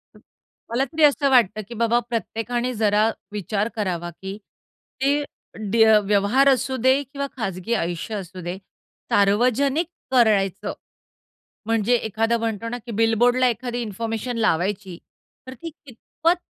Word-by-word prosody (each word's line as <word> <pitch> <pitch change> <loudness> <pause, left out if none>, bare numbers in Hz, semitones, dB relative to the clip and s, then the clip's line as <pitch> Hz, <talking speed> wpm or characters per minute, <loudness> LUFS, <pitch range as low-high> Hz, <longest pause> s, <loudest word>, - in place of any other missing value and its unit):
तर - - -16 0.5
मला 240 +4 +1
तरी 310 +4 -1
असं 285 -1 +4
वाटतं, 230 -5 +3
की 240 - -8
बाबा 230 +1 +2
प्रत्येकाने 240 +2 -2
जरा 215 -1 +2 0.2
विचार 210 +1 -2
करावा, 180 -5 -2
की 190 +4 -8 0.6
ती 285 +2 +2 0.5
ड्य 220 -1 +6
व्यवहार 205 +7 +3
असू 260 0 +1
दे 260 +2 +5
किंवा 280 +1 -5
खाजगी 195 -1 -3
आयुष्य 175 +5 -4
असू 185 -2 -7
दे, 175 +2 -5 0.5
सार्वजनिक 250 - +2 0.2
करायचं. 210 -7 +2 0.9
म्हणजे 225 +1 +2
एखादा 225 0 0
म्हणतो 230 -1 -3
ना, 245 - -4
की 240 - -6
बिलबोर्डला 245 +3 +3
एखादी 245 +1 -3
इन्फॉर्मेशन 225 +2 -4
लावायची. 190 -3 0 0.5
तर 260 - -7
ती 295 +7 -8
कितपत, 315 +3 -2
225 Hz, 130 wpm, -23 LUFS, 205-255 Hz, 0.9 s, ड्य